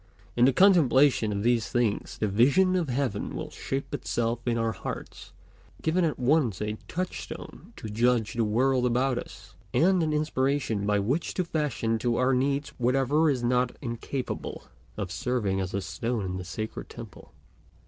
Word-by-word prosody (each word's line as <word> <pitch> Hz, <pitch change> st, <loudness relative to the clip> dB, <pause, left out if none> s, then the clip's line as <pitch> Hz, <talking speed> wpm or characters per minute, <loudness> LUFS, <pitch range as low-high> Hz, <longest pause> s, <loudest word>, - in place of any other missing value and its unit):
In 120 Hz, -, +5 dB
the 135 Hz, -, +5 dB
contemplation 145 Hz, -, +4 dB
of 100 Hz, 0 st, -2 dB
these 115 Hz, -4 st, +2 dB
things 120 Hz, -4 st, -1 dB
the 110 Hz, -, 0 dB
vision 140 Hz, -, +4 dB
of 170 Hz, -6 st, 0 dB
heaven 125 Hz, -5 st, -2 dB
will -, -, -5 dB
shape 135 Hz, 0 st, -4 dB
itself 115 Hz, 0 st, -1 dB
in 120 Hz, -1 st, +1 dB
our 115 Hz, 0 st, +1 dB
hearts, -, -, -7 dB, 0.5 s
giving 170 Hz, +3 st, +2 dB
at 160 Hz, -3 st, 0 dB
once 125 Hz, -, +2 dB
a 105 Hz, 0 st, -3 dB
touchstone 185 Hz, +2 st, -6 dB
to -, -, -7 dB
judge 115 Hz, +1 st, +1 dB
the 115 Hz, -, +1 dB
world 125 Hz, +4 st, +2 dB
about 125 Hz, +1 st, +1 dB
us, -, -, -11 dB, 0.2 s
and 185 Hz, +2 st, +4 dB
an 155 Hz, -1 st, 0 dB
inspiration 135 Hz, -8 st, 0 dB
by 105 Hz, 0 st, +3 dB
which 125 Hz, +12 st, -1 dB
to 185 Hz, -, +1 dB
fashion 140 Hz, -9 st, -1 dB
to 120 Hz, 0 st, 0 dB
our 130 Hz, +2 st, +2 dB
needs 140 Hz, +2 st, 0 dB
whatever 135 Hz, +5 st, +2 dB
is 130 Hz, -4 st, 0 dB
not 125 Hz, 0 st, +1 dB
incapable 125 Hz, +1 st, -5 dB, 0.3 s
of 100 Hz, -4 st, -4 dB
serving 100 Hz, -4 st, -1 dB
as 95 Hz, 0 st, -3 dB
a 100 Hz, -, -2 dB
stone 115 Hz, +1 st, -3 dB
in 95 Hz, 0 st, -3 dB
the 90 Hz, -, -6 dB
sacred 110 Hz, +4 st, -5 dB
temple. -, -, -11 dB
125 Hz, 170 wpm, -27 LUFS, 110-140 Hz, 0.5 s, In